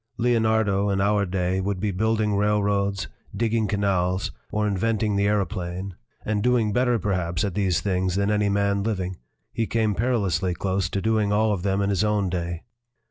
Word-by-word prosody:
Leonardo 110 -4 +2
in 100 -1 0
our 100 0 +2
day 90 0 0
would 100 0 -2
be 105 0 -1
build 110 +4 0
ing 105 -2 +1
railroads, 100 -2 +1 0.3
digging 115 -1 +1
canals, 95 -2 0 0.2
or 105 0 0
inventing 105 +1 0
the 100 0 +2
aero 105 -1 +2
plane 95 0 -5 0.3
and 105 -1 0
doing 115 -3 +2
better, 125 0 +2
perhaps, 90 -5 -1
at 100 - -1
these 95 -3 +1
things 95 -2 0
than 100 +1 +1
any 105 -1 +2
man 100 0 +1
living; 95 -4 -2 0.4
he 115 -2 -1
came 110 -2 +1
perilously 95 -6 0
close 95 -2 -1
to 95 - -3
doing 110 -2 +1
all 105 +1 +2
of 95 - -3
them 100 +1 0
in 100 - 0
his 100 +1 +1
own 105 -3 +1
day. 85 -1 -3
100 Hz, 185 wpm, -24 LUFS, 95-105 Hz, 0.4 s, Leonardo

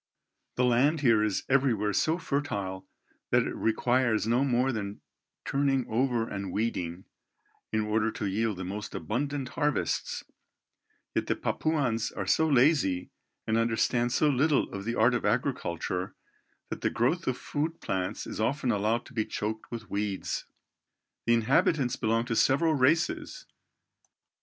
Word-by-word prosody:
The 125 - +2
land 135 +6 +3
here 115 -5 +4
is 105 -3 0
everywhere 120 -7 +2
so 160 +9 +2
fertile 100 - -3 0.4
that - - +4
it - - -3
requires 115 0 +1
no 120 +4 +2
more 130 0 +2
than 105 -3 -4 0.5
turning 135 -2 +1
over 120 0 +1
and 95 -2 -5
weeding, 95 -5 -2 0.7
in 110 - +1
order 105 +1 +1
to 105 - -4
yield 105 +1 0
the 95 - -4
most 105 +3 -5
abundant 135 +3 -2
harvests; 150 +1 -1 0.9
yet - - -1
the - - +1
Papuans 135 -8 0
are - - -4
so 160 - +3
lazy 130 - +3 0.3
and 110 +1 +1
understand 120 +1 +1
so 150 - +3
little 145 +1 +2
of 100 0 -5
the 115 +1 -1
art 115 +3 +4
of 120 - -1
agriculture, 90 +2 -1 0.6
that - - -4
the - - +2
growth 160 +10 0
of 130 -1 0
food 160 +3 -3
plants 95 -2 -3
is - - -5
often 130 +2 +1
allowed 110 +3 0
to - - -14
be 110 -2 +1
choked 110 +1 -4
with 115 -4 -7
weeds. 100 -1 -2 0.8
The 115 - +5
inhabitants 125 +3 +2
belong 115 0 0
to 120 -2 -2
several 155 +7 +3
races. 150 +4 +1
115 Hz, 145 wpm, -29 LUFS, 105-135 Hz, 0.9 s, The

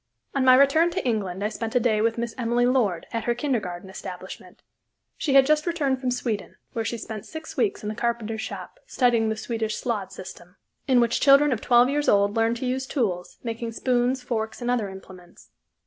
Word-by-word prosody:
On 275 - +1
my 255 -1 +7
return 280 +5 +5
to 360 -2 -3
England 200 -5 -1
I 210 - +1
spent 225 +1 -5
a - - +6
day 220 -3 +2
with 225 +1 +1
Miss 235 -1 -3
Emily 240 -1 +1
Lord, 230 -10 +1
at 230 - -2
her 240 - +1
kindergarten 210 -10 -2
establishment. 190 - -9 0.5
She 275 -3 -1
had 270 -1 +8
just 305 +3 +2
returned 280 -6 0
from 255 - 0
Sweden, 235 -5 -3 0.2
where 225 - -1
she 235 - -3
spent 215 -1 -7
six 315 0 -8
weeks 400 - 0
in 210 - -3
the - - -3
carpenter's 225 -1 -2
shop, - - -7
studying 235 -3 +2
the 220 - -1
Swedish 220 -1 -3
Slöjd 215 -6 -3
system, 185 -1 -11 0.3
in 260 -2 +4
which 235 0 +1
children 280 +1 +6
of 235 - -1
twelve 240 0 +5
years 290 +2 +1
old 200 +1 +3
learn 225 +1 +2
to 240 - -4
use 260 +1 -2
tools, 190 - -2
making 230 -1 -4
spoons, 250 +2 0
forks, 225 -3 -3
and 245 0 -1
other 225 -5 0
implements. 190 -2 -13
235 Hz, 205 wpm, -25 LUFS, 215-260 Hz, 0.5 s, had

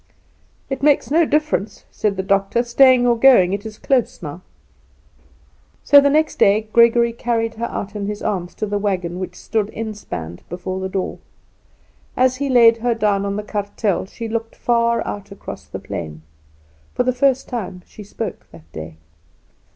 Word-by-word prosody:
"It 270 -1 -4
makes 285 -1 +2
no 325 +1 +4
difference," 300 -9 -1
said 205 -2 -1
the 190 - -1
doctor; 195 +4 +1
"staying 250 +1 +5
or 240 -1 +4
going; 230 -7 +5
it 200 +2 -3
is 215 -1 -10
close 255 -8 0
now." 150 +3 -7 1.4
So 285 -1 +7
the 280 - +3
next 310 +2 +1
day 215 +2 +3
Gregory 235 0 +5
carried 230 -1 -1
her 235 +2 -3
out 200 +1 -6
in 200 -1 -3
his 210 0 -5
arms 185 -4 -3
to - - -2
the 205 0 -2
wagon 180 -4 -2
which 185 - -6
stood 215 -2 -2
inspanned 205 - -6
before 180 +2 -5
the 190 0 -3
door. 190 0 -3 1.0
As 255 0 +3
he 280 +1 -2
laid 230 -3 +6
her 235 0 0
down 200 -2 +1
on 200 - -2
the 210 - -3
kartel 205 -2 -2
she 230 +3 -7
looked 225 0 -4
far 235 -1 +1
out 205 0 -6
across 200 - -9
the - - -6
plain. 80 -1 -7 0.7
For - - +2
the 255 0 +1
first 265 +1 +1
time 190 -7 -5
she 210 - -12
spoke 215 +2 -6
that 80 -1 -16
day. 80 0 -8
215 Hz, 175 wpm, -20 LUFS, 195-240 Hz, 1.4 s, So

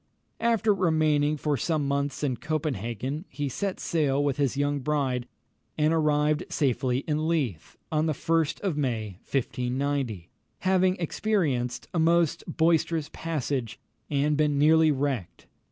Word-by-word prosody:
After 225 -2 +3
remaining 155 -5 +2
for 150 0 0
some 150 +2 0
months 140 +1 -1
in 130 -4 0
Copenhagen, 140 - -3
he 145 +2 -3
set 195 +8 -3
sail 145 -4 +1
with 140 -2 0
his 140 -2 0
young 145 0 +1
bride, 130 -3 -1 0.5
and 155 +1 +3
arrived 150 -1 +2
safely 130 -2 0
in 155 0 0
Leith, 135 - -2
on 155 0 +1
the 155 - +1
1st 165 +1 0
of 190 -6 -1
May 110 -9 -2
1590, 125 -6 -2 0.3
having 185 -1 +3
experienced 160 - -1
a 170 - 0
most 165 -1 +3
boisterous 165 -1 +1
passage, 140 -8 -3 0.3
and 145 +1 +1
been 150 -1 +2
nearly 160 +2 +5
wrecked. 135 - -2
145 Hz, 135 wpm, -27 LUFS, 135-160 Hz, 0.5 s, nearly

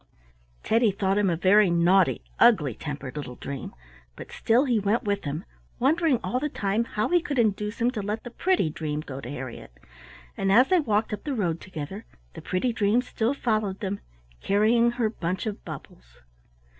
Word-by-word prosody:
Teddy 225 0 +3
thought 195 0 0
him 200 -2 +2
a 170 - +1
very 195 +3 +5
naughty, 175 +2 +3 0.2
ugly 185 - +5
tempered 140 +1 -6
little 140 -4 -6
dream, 140 +1 -6 0.4
but - - -10
still 240 +5 +2
he 240 -5 +2
went 205 +3 +1
with 200 -3 -2
him, 150 +6 -4 0.3
wondering 290 +1 +2
all 250 - -1
the 300 +3 -2
time 205 -2 -1
how 210 -2 -2
he 350 -1 +3
could 290 -4 -4
induce 210 0 0
him 240 +1 +2
to 220 -5 -4
let 210 +3 -3
the 240 - -8
pretty 365 - +1
dream 150 -1 -3
go 135 -3 -7
to 125 - -8
Harriett, 125 - -8 0.6
and 195 - 0
as 250 +6 +6
they 370 - +4
walked 215 -6 0
up 210 - -5
the 290 -3 -2
road 170 -7 -1
together 190 +4 -7 0.3
the - - -9
pretty 230 +7 -1
dream 225 +2 +2
still 235 +2 -1
followed 215 -7 -1
them, 200 -1 -3 0.4
carrying 225 +4 +3
her 240 -2 0
bunch 185 -3 -3
of 210 -2 -5
bubbles. - - -11
205 Hz, 185 wpm, -26 LUFS, 170-235 Hz, 0.6 s, as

